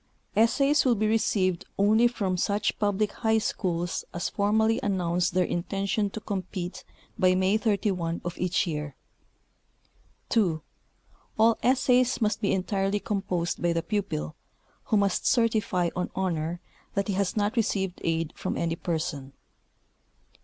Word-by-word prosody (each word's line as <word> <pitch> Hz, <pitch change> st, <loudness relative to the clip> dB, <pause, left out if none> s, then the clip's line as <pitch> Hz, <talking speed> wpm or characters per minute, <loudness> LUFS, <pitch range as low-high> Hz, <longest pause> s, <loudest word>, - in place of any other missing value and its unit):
Essays 275 Hz, +6 st, +4 dB
will 250 Hz, -3 st, +3 dB
be 215 Hz, 0 st, 0 dB
received 195 Hz, -5 st, +1 dB
only 215 Hz, +4 st, +5 dB
from 200 Hz, -6 st, -1 dB
such 205 Hz, +4 st, 0 dB
public 205 Hz, 0 st, +1 dB
high 220 Hz, -1 st, +1 dB
schools 175 Hz, -5 st, -1 dB
as 175 Hz, -, -1 dB
form 205 Hz, +2 st, +1 dB
ally 220 Hz, +1 st, +3 dB
amiounce 180 Hz, -3 st, 0 dB
their 180 Hz, +1 st, +1 dB
intention 195 Hz, +4 st, -1 dB
to 220 Hz, -, -6 dB
comjpete 185 Hz, -3 st, -5 dB, 0.4 s
by 185 Hz, -1 st, +4 dB
May 190 Hz, +2 st, +2 dB
31, 200 Hz, -6 st, 0 dB
1893. 170 Hz, -4 st, -2 dB, 1.4 s
2. 180 Hz, -9 st, +2 dB, 0.8 s
All 225 Hz, +1 st, +4 dB
essays 255 Hz, -1 st, +3 dB
must 215 Hz, -1 st, 0 dB
be 200 Hz, -, +1 dB
entirely 195 Hz, +1 st, 0 dB
composed 190 Hz, -5 st, -2 dB
by 175 Hz, -1 st, +2 dB
the 165 Hz, 0 st, -1 dB
student, 170 Hz, -, -2 dB, 0.5 s
who 215 Hz, -, +2 dB
must 200 Hz, -2 st, +1 dB
cer 235 Hz, -2 st, +4 dB
tify 185 Hz, -6 st, 0 dB
on 180 Hz, -, -2 dB
honor 170 Hz, -2 st, -2 dB, 0.3 s
that 200 Hz, 0 st, 0 dB
he 200 Hz, -, 0 dB
has 195 Hz, +2 st, -1 dB
not 210 Hz, +3 st, +1 dB
received 195 Hz, -5 st, -1 dB
aid 165 Hz, -1 st, -1 dB
from -, -, -3 dB
any 165 Hz, -1 st, -1 dB
person. 160 Hz, -5 st, -3 dB
195 Hz, 140 wpm, -27 LUFS, 175-215 Hz, 1.4 s, only